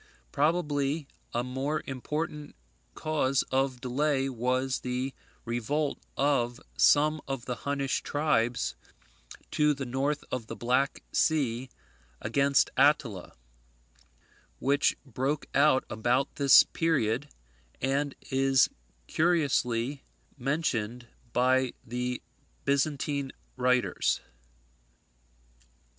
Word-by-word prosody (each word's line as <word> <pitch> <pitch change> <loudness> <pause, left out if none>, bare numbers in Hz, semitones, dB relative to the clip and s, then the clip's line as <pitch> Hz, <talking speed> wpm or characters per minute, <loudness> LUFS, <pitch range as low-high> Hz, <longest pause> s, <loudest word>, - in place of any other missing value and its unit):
Probably 150 -2 0 0.2
a 120 - -1
more 135 +4 -2
important 150 +3 -4 0.4
cause 140 -4 +1
of 130 -1 +1
delay 135 +1 0
was 130 +1 0
the 125 +1 -3 0.3
revolt 140 +6 -1 0.2
of 125 -4 +1 0.2
some 150 +1 +4
of 135 -3 -4
the 125 -2 -3
Hunnish 140 -1 0
tribes 140 -6 0 0.8
to 150 -1 +3
the 135 -1 -4
north 135 +4 -1
of 120 -3 -3
the - - -6
Black 130 +4 0
Sea 130 -5 +1 0.5
against 140 +5 +2
Attila, 135 - +2 1.2
which 140 +2 +2
broke 135 +3 -2
out 140 -2 +4
about 120 +5 0
this 140 -2 +8
period, 145 -4 0 0.5
and 140 +2 0 0.2
is 135 -1 +4 0.4
cursorily 140 -6 +1 0.3
mentioned 125 -4 -1 0.3
by 130 +1 +2
the 125 +1 -3 0.4
Byzantine 140 -1 0 0.2
writers. 125 -1 +1
135 Hz, 90 wpm, -29 LUFS, 125-145 Hz, 1.2 s, this